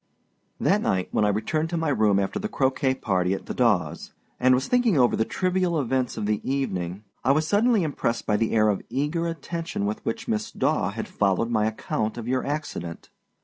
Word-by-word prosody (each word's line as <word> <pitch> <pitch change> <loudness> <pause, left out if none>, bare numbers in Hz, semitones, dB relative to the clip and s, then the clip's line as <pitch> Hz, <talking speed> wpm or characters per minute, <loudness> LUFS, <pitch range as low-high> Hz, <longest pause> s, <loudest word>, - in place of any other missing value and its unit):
That - - +2
night 95 -1 0
when 105 - +2
I - - +3
returned 155 +11 -1
to 170 - -2
my 165 -2 0
room 110 -7 +3
after 100 - -1
the 215 +1 -3
croquet 130 -4 +1
party 95 -6 0
at - - -8
the - - -4
Dawâs, 100 -11 0 0.3
and 130 0 +5
was 130 +2 -1
thinking 245 -8 +3
over 125 -2 +4
the 110 - +1
trivial 185 -3 0
events 130 -2 -1
of - - -2
the 105 0 0
evening, 95 -9 -2 0.2
I 135 - +4
was 155 +2 +2
suddenly 215 +2 +3
impressed 140 -6 -1
by 105 - +2
the 115 - 0
air 110 -1 +4
of 100 - 0
eager 150 +7 -1
attention 165 -6 -4
with 105 +1 -3
which 115 - -3
Miss 225 0 -1
Daw 145 -12 +1
had 110 +3 -5
followed 100 +3 0
my 110 -2 +2
account 110 0 -2
of 115 -1 -5
your 130 +1 0
accident. 140 - -5
125 Hz, 205 wpm, -25 LUFS, 105-160 Hz, 0.3 s, and